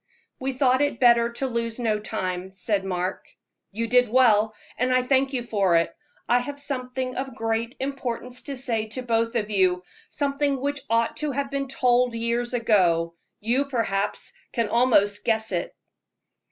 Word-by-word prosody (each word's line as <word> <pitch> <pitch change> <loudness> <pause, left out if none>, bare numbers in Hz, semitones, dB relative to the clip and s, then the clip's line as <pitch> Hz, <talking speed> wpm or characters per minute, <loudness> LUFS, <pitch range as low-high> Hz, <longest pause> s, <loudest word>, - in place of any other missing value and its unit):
"We 265 +1 -2
thought 260 0 +3
it 285 -5 0
better 235 -1 +5
to 270 - -2
lose 230 -2 -2
no 220 -4 0
time," 185 -3 -4
said 200 0 -1
Mark. 185 -1 -3 0.4
"You 225 +3 -2
did 245 0 +4
well, 220 -3 +4 0.2
and 250 +1 +1
I 255 0 +3
thank 265 +1 +2
you 255 -3 -1
for 200 -6 +2
it. 165 0 0 0.3
I 245 - +4
have 285 +3 -6
something 255 -2 -4
of 265 -1 -4
great 225 +1 -2
importance 250 -2 -4
to 275 -2 -5
say 230 -4 -1
to 250 +4 -6
both 230 0 0
of 215 -2 -1
you 185 -2 +2 0.3
something 280 -1 0
which 285 +1 -2
ought 230 0 +1
to 300 -2 -1
have 275 +1 -2
been 275 0 -2
told 250 -2 +2
years 235 +1 -1
ago. 175 -8 +2 0.3
You, 245 +6 +1
perhaps, 210 -6 -2 0.2
can 230 -3 0
almost 205 -4 +3
guess 220 -1 0
it." 175 -2 -3
235 Hz, 165 wpm, -25 LUFS, 215-260 Hz, 0.4 s, better